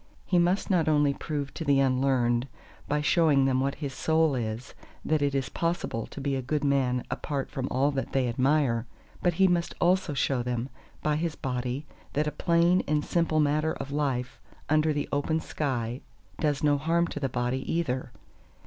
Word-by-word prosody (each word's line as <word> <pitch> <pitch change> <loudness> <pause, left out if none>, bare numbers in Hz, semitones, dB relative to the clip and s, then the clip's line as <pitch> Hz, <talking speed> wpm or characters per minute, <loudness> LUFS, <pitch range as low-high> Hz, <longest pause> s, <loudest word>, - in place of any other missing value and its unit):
He 180 - +3
must 180 +4 +1
not 165 -4 +3
only 145 -2 +3
prove 145 -2 -4
to 165 - -5
the 140 -3 +3
unlearned 130 -2 +2 0.4
by 150 +1 0
showing 150 -3 +4
them 130 -1 +2
what 135 +1 0
his 140 -2 -5
Soul 160 +3 +2
is 115 -1 -4 0.3
that 155 -1 +1
it 140 -1 +1
is 135 -2 -1
possible 165 -9 -2
to - - -9
be 140 0 -1
a 130 - -1
good 150 +4 -2
man 130 -3 +1
apart 140 -2 -3
from 130 -2 -3
all 140 +3 +2
that 135 -1 -3
they 130 -2 +1
admire; 125 -1 +1 0.3
but 175 -2 +1
he 190 +2 +5
must 175 -1 0
also 180 -3 +2
show 135 -1 +1
them, 120 +1 -2 0.3
by 150 -1 +1
his 160 0 -2
body, 125 +1 -3 0.3
that 150 +2 +1
a 150 - -1
plain 170 +4 +3
and 150 -1 +1
simple 165 -2 +1
manner 155 +1 +2
of 140 - -6
life 135 -4 -2 0.3
under 155 +1 +3
the 145 -1 -2
open 150 +3 0
sky 125 -6 -3 0.4
does 150 -2 0
no 145 -1 +3
harm 165 +3 +2
to 150 - -5
the 135 -2 -1
body 125 +2 -2
either. 130 -7 -1
145 Hz, 185 wpm, -28 LUFS, 130-155 Hz, 0.4 s, he